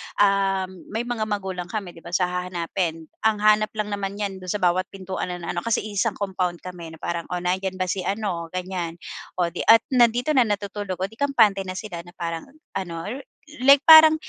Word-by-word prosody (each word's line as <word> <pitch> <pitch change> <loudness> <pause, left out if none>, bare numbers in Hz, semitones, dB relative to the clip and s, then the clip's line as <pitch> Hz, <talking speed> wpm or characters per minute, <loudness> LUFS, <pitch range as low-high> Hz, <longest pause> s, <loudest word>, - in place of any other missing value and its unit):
um, 195 -2 +2
may 225 +3 -2
mga 235 -3 -2
magulang 190 -4 -3
kami, 195 -2 -4
'di 165 - -14
ba 170 +1 -5
so 185 - +3
hahanapin. 180 -2 -2 0.2
Ang 215 -1 +2
hanap 215 0 +5
lang 210 -1 -2
naman 200 -1 -3
niyan 200 -2 -3
dun 185 -1 -8
sa 205 -1 -2
bawat 180 +1 +2
pintuan 190 -1 -5
na 180 -1 -4
ano 175 - -2
kasi 230 +4 0
iisang 205 -2 -1
compound 185 -3 -2
kami 170 -3 -8
na - - -16
parang, 170 -1 -3
"O 180 - -3
nandiyan 185 +1 -1
ba 185 0 -1
si 185 +2 -2
ano?" 195 -5 -2
Ganyan. 180 -2 -3 0.4
O 175 -2 0
di 175 - -7
ah, 225 - +10
nandito 245 +3 +4
na 255 -6 +4
natutulog 200 -2 -3
o - - +3
'di 225 +5 -12
kampante 220 -9 +3
na 185 - -4
sila 190 -4 -6
na 175 +1 -16
parang 170 +5 -4 0.3
ano, 170 -2 -5 0.6
like 280 0 +8
parang 315 0 +10
190 Hz, 200 wpm, -24 LUFS, 180-210 Hz, 0.6 s, ah